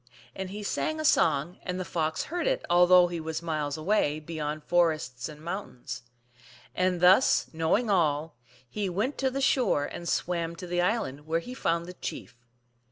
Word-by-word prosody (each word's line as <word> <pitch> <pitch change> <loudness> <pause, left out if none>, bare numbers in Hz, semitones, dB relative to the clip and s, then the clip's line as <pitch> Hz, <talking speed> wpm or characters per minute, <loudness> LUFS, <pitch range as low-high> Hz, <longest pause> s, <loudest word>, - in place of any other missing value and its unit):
And 190 -1 -5
he 205 +2 -6
sang 310 +9 -1
a 310 - -2
song, 150 - +2
and 180 0 -4
the 185 - -3
Fox 160 -2 -1
heard 350 +8 -3
it, - - 0
although 180 +1 +7
he 175 -1 -3
was 160 +1 -4
miles 155 -3 -2
away, 155 -3 +1
beyond 155 -1 -4
forests 155 -8 0
and 150 -1 -11
moun 180 -4 -5
tains. 125 -2 -5 0.7
And 185 -1 0
thus 185 +8 +5
knowing 165 +9 +1
all, 155 -4 +1 0.3
he 205 +7 -3
went 210 +11 -2
to 265 - +2
the 270 +1 -3
shore 250 - +2
and 170 +3 -6
swam 170 -1 -1
to 180 - -8
the 175 0 0
island, 175 - -1
where 165 +1 +1
he 245 +9 -8
found 170 -8 -1
the 180 - -8
chief. 175 - -7
175 Hz, 180 wpm, -28 LUFS, 155-195 Hz, 0.7 s, although